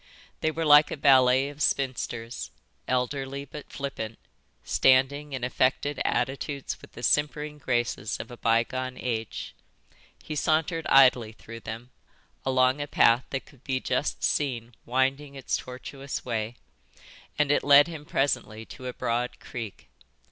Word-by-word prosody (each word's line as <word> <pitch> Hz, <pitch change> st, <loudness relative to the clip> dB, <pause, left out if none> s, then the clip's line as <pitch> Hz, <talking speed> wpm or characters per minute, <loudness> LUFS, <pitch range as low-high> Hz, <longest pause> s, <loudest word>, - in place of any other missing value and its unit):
They 160 Hz, -, +1 dB
were 160 Hz, +1 st, -2 dB
like 150 Hz, 0 st, +7 dB
a -, -, -4 dB
ballet 130 Hz, -1 st, +5 dB
of 145 Hz, +1 st, -10 dB
spinsters, 125 Hz, -4 st, -1 dB, 0.4 s
elderly 135 Hz, +2 st, -2 dB
but 145 Hz, +2 st, -10 dB
flippant, 115 Hz, -6 st, -5 dB, 0.5 s
standing 135 Hz, +3 st, +3 dB
in 130 Hz, -2 st, -4 dB
affected 130 Hz, +3 st, 0 dB
attitudes 135 Hz, +2 st, -2 dB
with -, -, -15 dB
the -, -, -10 dB
simpering 150 Hz, +2 st, 0 dB
graces 120 Hz, -4 st, -1 dB
of -, -, -7 dB
a 120 Hz, -, -9 dB
bygone 125 Hz, +3 st, 0 dB
age. 115 Hz, -4 st, -4 dB, 0.7 s
He 155 Hz, -, -5 dB
sauntered 160 Hz, +3 st, +1 dB
idly 125 Hz, -5 st, +5 dB
through 115 Hz, +1 st, -10 dB
them, 115 Hz, +3 st, -8 dB, 0.5 s
along 130 Hz, +1 st, +2 dB
a 145 Hz, -, -3 dB
path 120 Hz, -2 st, +4 dB
that 135 Hz, -, -4 dB
could 135 Hz, -2 st, -20 dB
be 130 Hz, -1 st, -1 dB
just -, -, -2 dB
seen 120 Hz, -5 st, 0 dB
winding 135 Hz, +3 st, 0 dB
its 135 Hz, -, -2 dB
tortuous 135 Hz, +2 st, -6 dB
way, 115 Hz, -1 st, -2 dB, 0.8 s
and 150 Hz, -1 st, +2 dB
it -, -, +2 dB
led 145 Hz, 0 st, +8 dB
him 160 Hz, -3 st, -7 dB
presently 120 Hz, -6 st, -1 dB
to 130 Hz, +2 st, -9 dB
a 125 Hz, -, -4 dB
broad 120 Hz, +1 st, -2 dB
creek. 115 Hz, -6 st, -8 dB
130 Hz, 140 wpm, -27 LUFS, 120-145 Hz, 0.8 s, led